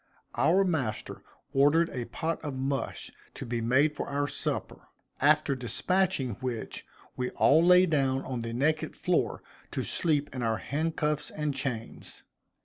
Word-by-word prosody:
Our 190 +4 +3
master 155 - -2 0.3
ordered 150 +5 +4
a 125 -2 -4
pot 165 +5 -3
of 145 -3 -4
mush 135 +1 -3 0.2
to - - -6
be 120 0 -2
made 135 +6 +3
for - - -4
our 145 0 -1
supper; - - -3 0.3
after 150 0 +4
despatching 130 - 0
which 125 -3 -4 0.3
we 125 0 -2
all 155 +4 +4
lay 180 +1 +7
down 135 -5 +1
on 130 -2 -3
the 115 0 -4
naked 150 +6 0
floor - - 0 0.3
to - - -3
sleep 150 -3 +1
in 125 - -3
our 115 -2 +1
handcuffs 150 +1 -1
and 150 -2 -2
chains. 130 -4 -5
140 Hz, 145 wpm, -29 LUFS, 125-155 Hz, 0.3 s, lay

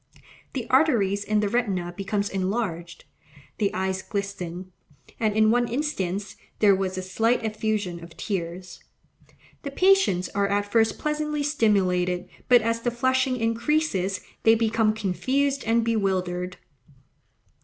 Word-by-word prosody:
The 250 -4 -4
arteries 225 -9 +3
in 210 0 +1
the 210 - +1
retina 200 -6 -1
become 200 +1 -1
enlarged; 185 -3 -3 0.5
the 200 -2 +1
eyes 190 0 -2
glisten, 190 -3 -5 0.5
and 215 -2 +1
in 215 0 +4
one 240 +1 +2
instance 205 - -3 0.2
there 205 -2 +5
was 190 -1 -2
a 185 - -3
slight 225 +6 +1
effusion 215 -5 -2
of 170 -1 -13
tears. 180 -2 -5 0.8
The 280 - -5
patients 365 - +3
are 200 0 0
at 205 +1 0
first 225 0 +3
pleasantly 300 -1 -2
stimulated, 185 -10 +1 0.2
but, 245 -2 +6
as 230 +1 0
the 240 - 0
flushing 260 +1 +1
increases, 230 - 0 0.2
they 225 0 +5
become 225 -1 +1
confused 265 +8 0
and 230 +1 +3
bewildered. 185 -5 -1
210 Hz, 130 wpm, -25 LUFS, 185-240 Hz, 0.8 s, but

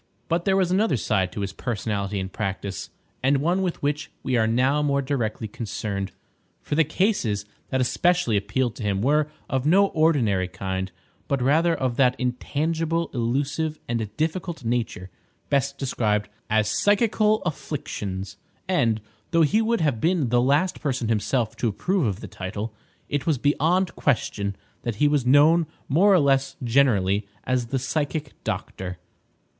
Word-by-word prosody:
But 170 +1 0
there 195 -1 +3
was 185 -2 +2
another 195 - +2
side 95 -4 0
to 105 - -5
his 100 -1 -3
personality 105 -3 -2
and 95 0 -5
practice, 100 -2 -4 0.3
and 135 +2 +3
one 170 +7 +1
with 180 -5 -2
which 145 +1 -1
we 130 - 0
are 110 -2 +3
now 130 +6 +2
more 140 -1 +2
directly 120 -5 -2
concerned; 100 -3 -4 0.5
for - - -5
the 160 +2 +5
cases 150 - 0 0.2
that 130 - 0
especially 175 -1 +2
appealed 105 +4 0
to - - -6
him 100 -1 0
were 150 +3 +3 0.2
of 130 -1 -1
no 195 +4 +5
ordinary 125 - +2
kind, 95 +1 -4 0.4
but 140 - 0
rather 160 +6 +3
of 130 -2 -2
that 125 -2 +4
intangible, 160 +6 -1
elusive, 140 +6 -1
and 115 -3 -2
difficult 165 -2 -2
nature 115 -6 -2 0.4
best 140 0 +1
described 105 -6 0 0.2
as 110 -1 +2
psychical 210 - +2
afflictions; 105 - -4 0.3
and, 115 - +2 0.3
though 165 -1 +4
he 205 +9 +3
would 230 -1 +1
have 140 -8 +1
been 165 -6 +2
the 120 +1 +3
last 145 +8 +2
person 130 -6 -1
himself 115 +1 0
to 120 - 0
approve 175 - 0
of 100 0 -3
the 105 - -6
title, 105 +3 -5 0.3
it 145 +1 -2
was 155 -4 +3
beyond 165 +7 +1
question 100 -7 0 0.3
that 120 -3 -3
he 145 +7 +3
was 145 -4 +1
known 155 +5 +5 0.2
more 180 +9 +4
or 190 - +6
less 135 -2 +2
generally 105 -6 +2 0.2
as 125 -2 0
the 135 - -1
"Psychic 145 +2 -2
Doctor." 90 -1 -4
130 Hz, 160 wpm, -24 LUFS, 110-160 Hz, 0.5 s, or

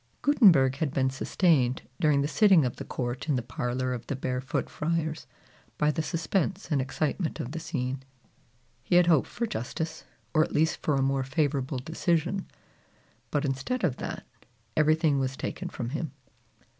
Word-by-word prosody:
Gutenberg 170 - +5
had 150 -3 -2
been 130 -1 +2
sustained, 135 -2 +2 0.2
during 150 -3 +3
the - - 0
sitting 190 -3 +5
of 125 - -3
the - - -5
court 125 +3 -4
in 145 - +3
the 125 - -1
parlor 125 +2 -2
of 120 -1 -6
the 140 - -2
Barefoot 130 0 -2
Friars, 160 0 -2 0.5
by 150 0 +3
the 160 - -1
suspense 175 +4 -1
and 140 -3 +3
excitement 155 +5 -2
of 120 - -4
the 165 - -4
scene. 135 -5 -3 0.8
He 130 +7 0
had 175 0 +7
hoped 165 -5 +4
for 235 - -3
justice, 160 - -4 0.3
or 155 - +5
at - - -5
least 160 +1 +2
for 150 - +1
a 135 - +2
more 135 0 +1
favorable 135 -1 0
decision; 170 +6 -1 0.8
but 145 0 0
instead 140 - -2
of 145 -8 +1
that, - - -5 0.5
everything 155 -2 +3
was 130 0 -2
taken - - -4
from 120 -2 -4
him. 155 +1 -3
145 Hz, 170 wpm, -28 LUFS, 130-165 Hz, 0.8 s, had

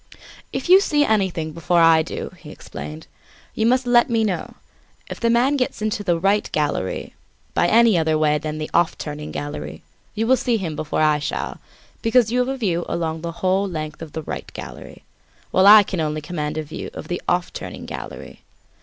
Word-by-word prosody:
"If - - -4
you 375 +2 +8
see 295 -6 +2
anything 190 - 0
before 170 +2 +1
I 165 -1 +6
do," - - -6
he - - -12
explained, 75 +2 -9 0.5
"you 220 - +1
must 255 +1 +2
let 245 0 +4
me 225 -1 +2
know. 200 -5 -3 0.6
If - - -6
the 230 - +1
man 250 +5 +3
gets 255 - -1
into 215 -1 -2
the 175 -4 +1
'right' 200 +3 +1
gallery 145 -11 -2 0.4
by 175 - +2
any 225 -3 +5
other 160 -1 +1
way 150 -1 +2
than 155 +1 -4
the 155 0 -5
'off 170 -1 +2
turning' 150 0 -6
gallery, 145 0 -6 0.3
you 220 +1 0
will 260 +3 +4
see 245 -1 +1
him 170 -7 -4
before 155 0 -2
I 150 -1 +3
shall, 145 - -4 0.4
because 225 -1 +3
you 250 - +1
have 250 - +1
a 270 - -2
view 175 -8 0
along 160 -1 -2
the 170 0 -4
whole 190 +2 +2
length 155 -3 -5
of 160 -3 -8
the 160 - -4
'right' - - -6
gallery, 60 -1 -9 0.5
while 190 +1 +5
I 210 0 +10
can 185 -2 -4
only 155 0 -2
command 150 -1 -4
a 155 - -1
view 150 - -7
of - - -7
the - - -3
'off - - 0
turning' - - -7
gallery. - - -8
175 Hz, 200 wpm, -22 LUFS, 155-225 Hz, 0.6 s, I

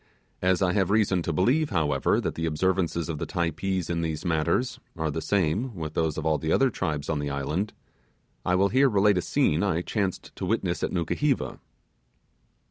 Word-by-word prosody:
As 95 +1 +2
I 90 -1 +2
have 95 -2 +1
reason 100 -4 +2
to 85 - -2
believe, 125 - +2
however, 75 - +1
the 80 0 -2
observances 85 +1 0
of 80 -3 -4
the 85 - -3
Typees 85 +2 -1
in 85 -1 -1
these 80 +1 -3
matters 85 +9 0 0.2
are 80 -1 -1
the 80 - -3
same 100 +7 0
with 80 -3 -5
those 80 -2 0
of 80 - -3
all 80 -1 +2
the 80 - -2
other 135 -1 +3
tribes 75 -7 -2
in 75 -2 -1
the 75 0 -2
island, 75 +9 -2 0.7
I 90 - +2
will 100 +2 +3
here 135 +4 +4
relate 100 -3 +3
a - - -1
scene 80 -1 +1
I 90 -4 0
chanced 100 -3 -3
to - - -3
witness - - 0
at - - 0
Nukuheva. 125 - -1
85 Hz, 190 wpm, -26 LUFS, 80-100 Hz, 0.7 s, here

